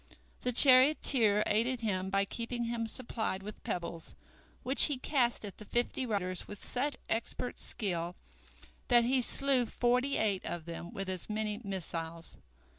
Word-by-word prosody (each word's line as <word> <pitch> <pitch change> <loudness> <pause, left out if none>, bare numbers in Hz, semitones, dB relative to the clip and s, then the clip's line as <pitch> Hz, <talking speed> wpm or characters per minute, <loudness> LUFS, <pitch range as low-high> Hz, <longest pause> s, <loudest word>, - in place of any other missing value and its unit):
The 250 - 0
charioteer 255 -4 +6
aided 235 +4 -1
him 190 -4 -3
by 195 0 0
keeping 235 +3 -5
him 230 -1 -3
supplied 220 -4 -4
with 210 +1 -10
pebbles, 170 -2 -6 0.5
which 265 +2 +8
he 290 -3 -2
cast 250 -4 -1
at 200 - -10
the 215 - -10
fifty 240 +3 -2
riders 185 -4 -4
with 205 - -10
such 280 +4 -2
expert 235 +2 -4
skill 175 -4 -3 0.7
that 240 -1 +4
he 255 +2 +1
slew 260 0 +2
forty 250 +4 0
eight 200 -4 -1
of 170 -2 -6
them 170 0 -8
with 195 -1 -6
as 185 +1 -5
many 215 0 -4
missiles. 165 -4 -6
220 Hz, 150 wpm, -31 LUFS, 190-250 Hz, 0.7 s, which